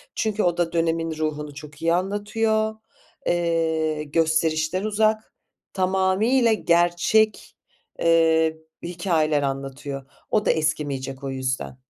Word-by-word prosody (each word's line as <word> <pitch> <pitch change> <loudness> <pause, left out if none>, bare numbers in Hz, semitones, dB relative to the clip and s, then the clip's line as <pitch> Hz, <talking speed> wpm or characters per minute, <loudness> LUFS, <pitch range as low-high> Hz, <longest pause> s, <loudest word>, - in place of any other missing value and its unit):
Çünkü 220 -1 0
o 175 -1 +1
da 170 -1 0
dönemin 165 -1 0
ruhunu 150 -1 -3
çok 145 +1 -11
iyi 165 0 +2
anlatıyor, 215 +4 0 0.5
eee, 160 -3 0
gösterişten 160 +3 +1
uzak, 215 +1 +1 0.4
tamamıyla 190 +6 +2
gerçek, 175 +4 +2 0.4
eee, 160 -1 +3 0.3
hikâyeler 170 -4 0
anlatıyor. 135 0 -4 0.3
O 210 -1 +2
da - - +4
eskimeyecek 140 -4 -2
o 135 - -3
yüzden. 130 -1 -3
165 Hz, 105 wpm, -23 LUFS, 155-190 Hz, 0.5 s, da